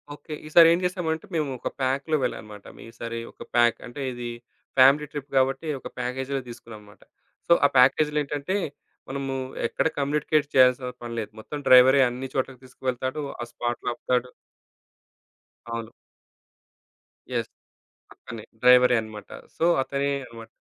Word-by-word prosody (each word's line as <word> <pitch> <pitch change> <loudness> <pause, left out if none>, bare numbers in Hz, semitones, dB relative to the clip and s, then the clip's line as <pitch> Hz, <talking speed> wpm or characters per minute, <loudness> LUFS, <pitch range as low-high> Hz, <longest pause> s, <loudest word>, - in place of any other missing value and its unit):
Okay. 155 - -10
ఈసారి 165 +2 +7
ఏం 170 - +1
జేసామంటే 180 -1 -2
మేము, 155 -3 0
ఒక - - -3
ప్యాక్‌లో 135 +4 0
వెళ్ళామన్నామట. 105 -4 -5 0.2
ఈసారి 115 0 -6
ఒక - - -22
ప్యాక్‌ 120 -1 +4
అంటే 120 +4 -8
ఇది, 120 -1 -6 0.5
ఫ్యామిలీ 135 +3 +6
ట్రిప్ 145 -1 -7
గాబట్టి, 135 +4 +1
ఒక - - -8
ప్యాగేజ్‌లో 130 +2 -2
తీసుకున్నామన్నామట. 110 -3 -12 0.4
సో, 170 - +7
ఆ - - +8
ప్యాకేజులో 150 +4 +4
ఏంటంటే, 145 +7 -2 0.5
మనము 135 0 -3 0.3
ఎక్కడ - - 0
కమ్యూనికేట్ 150 +1 +1
చేయాల్సిన 125 0 +5 0.2
పని 120 0 -6
లేదు. 110 - -5
మొత్తం 150 +7 -7
డ్రైవరే 130 +2 +8
అన్నిచోట్లకి 130 +1 -4
తీసుకువెళ్తాడు. 130 +2 -4 0.2
ఆ - - -2
స్పాట్‌లో 120 0 -3
ఆపుతాడు. 125 +1 -1 1.4
అవును. - - -5 1.4
యెస్. - - -1 0.7
అతనే 115 - -10 0.2
డ్రైవరే 125 0 +6
అనమాట. 110 -1 -10 0.3
సో, - - 0 0.2
అతనే 140 +1 -2 0.2
అన్నమాట. 115 -1 -12
130 Hz, 130 wpm, -25 LUFS, 120-145 Hz, 1.4 s, ఆ